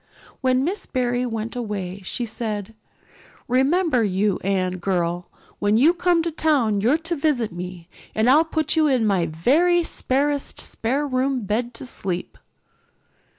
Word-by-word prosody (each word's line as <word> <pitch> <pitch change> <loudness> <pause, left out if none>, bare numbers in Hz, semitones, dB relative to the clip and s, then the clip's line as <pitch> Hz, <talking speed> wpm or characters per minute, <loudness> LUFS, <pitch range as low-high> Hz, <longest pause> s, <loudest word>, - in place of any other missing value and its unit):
When 255 0 +2
Miss 370 +8 -2
Barry 250 -1 0
went 225 0 -4
away 200 -5 -4
she 240 +6 -3
said: 215 -2 -4 0.7
"Remember, 270 +1 +2
you 200 0 +1
Anne 185 -1 0
girl, 175 -1 -1 0.3
when 205 +1 +2
you 300 +8 +5
come 350 -1 +2
to 335 - -2
town 270 -10 +1
you're 250 +9 +3
to 330 +1 -2
visit 280 -7 0
me 175 -1 -7 0.3
and 220 +2 +2
I'll 290 +5 +6
put 315 -1 0
you 315 -1 +4
in 255 -5 +2
my 190 -5 +2
very 310 - +3
sparest 285 -1 -1
spare 270 +6 -1
room 260 -1 0
bed 230 +4 -2
to 245 - -8
sleep." 185 -7 -4
245 Hz, 150 wpm, -23 LUFS, 200-290 Hz, 0.7 s, I'll